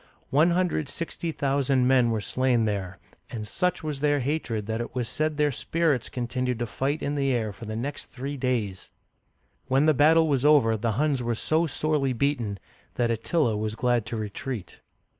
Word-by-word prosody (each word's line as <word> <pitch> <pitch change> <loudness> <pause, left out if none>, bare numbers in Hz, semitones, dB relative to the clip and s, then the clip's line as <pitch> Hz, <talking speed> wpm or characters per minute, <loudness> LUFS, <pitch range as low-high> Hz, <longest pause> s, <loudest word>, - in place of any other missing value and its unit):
One 155 +5 +5
hundred 180 -1 +1
and 150 -2 -5
sixty 170 0 -4
thousand 135 -3 +1
men 130 -2 +4
were 110 -2 0
slain 125 +1 +1
there, 100 -4 -3 0.3
and 110 -3 -5
such 180 - -1
was 150 -3 -3
their 145 0 +2
hatred 125 -6 -2
that 110 +2 -2
it 120 - -7
was 125 -2 -1
said 155 +3 -1
their 150 -1 +2
spirits 155 -1 0
continued 125 0 -2
to 120 - -2
fight 140 +7 -2
in 145 - -1
the 140 -2 +1
air 110 -4 -1
for 115 +4 -10
the 110 0 -5
next 135 +5 -4
three 135 +3 -6
days! 120 -8 -2 0.8
When 135 +3 +3
the 155 - +5
battle 160 +3 +5
was 140 -4 +1
over, 145 -7 +5
the 110 +1 -1
Huns 140 +2 +1
were 120 -1 -1
so 160 +8 +1
sorely 150 -2 0
beaten 120 -5 -1 0.4
that 120 -1 +1
Attila 115 +2 +1
was 110 +1 -2
glad 120 -2 +1
to 115 - -3
retreat. 110 -1 -5
130 Hz, 190 wpm, -26 LUFS, 115-145 Hz, 0.8 s, One